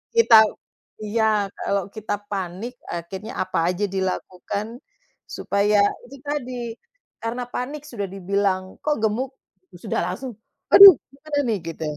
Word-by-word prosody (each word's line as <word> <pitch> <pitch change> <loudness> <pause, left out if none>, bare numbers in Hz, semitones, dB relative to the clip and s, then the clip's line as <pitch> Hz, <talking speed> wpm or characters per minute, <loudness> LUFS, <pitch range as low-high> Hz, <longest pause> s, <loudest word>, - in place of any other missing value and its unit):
kita 460 - +6 0.7
iya, 220 +2 0 0.3
kalau 200 -1 -1
kita 215 -1 -3 0.2
panik 195 +4 -4 0.2
akhirnya 190 +7 -6
apa - - -2
aja 180 +3 -2
dilakukan 190 +2 -3 0.7
supaya 205 +1 +1 0.3
itu 265 +3 -12
tadi, 285 -4 -3 0.7
karena 235 +2 -3
panik 280 +4 -4
sudah 205 -5 -4
dibilang," 195 0 0 0.2
Kok, 300 -1 +1
gemuk," 245 +5 0 0.5
sudah - - -1
langsung, 215 +9 -5 0.4
"Aduh, 395 -2 +12 0.2
gimana 290 +2 -4
nih," 220 -3 +1
gitu. 165 -1 -6
210 Hz, 120 wpm, -23 LUFS, 190-255 Hz, 0.7 s, Aduh